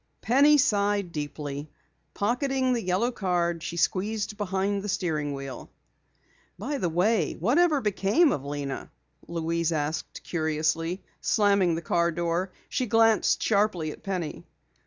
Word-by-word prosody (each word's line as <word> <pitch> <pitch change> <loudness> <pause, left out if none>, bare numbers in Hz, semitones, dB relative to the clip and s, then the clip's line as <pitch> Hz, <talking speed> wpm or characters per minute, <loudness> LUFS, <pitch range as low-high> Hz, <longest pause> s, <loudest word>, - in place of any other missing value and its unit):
Penny 285 +5 +5
sighed 205 -7 +1
deeply. 145 -1 -5 0.5
Pocketing 255 +4 +1
the 235 - 0
yellow 185 +6 0
card, 175 -5 -1
she 170 +1 -5
squeezed 205 +5 0
behind 200 0 -1
the 205 - -5
steering 155 -7 -1
wheel. 135 -1 -7 0.9
"By 275 +8 -3
the 175 - 0
way, 190 +6 +1
whatever 290 - +2
became 210 - +3
of 135 - -2
Lena?" 140 -1 -5 0.4
Louise 170 0 -1
asked 155 0 -3
curiously, 160 +2 -1 0.2
slamming 200 -5 +3
the 165 - -5
car 170 +1 +1
door. 170 +2 -1 0.2
She 255 -3 -1
glanced 225 0 +3
sharply 200 -7 +1
at - - -11
Penny. 180 -5 -4
185 Hz, 130 wpm, -27 LUFS, 165-215 Hz, 0.9 s, Penny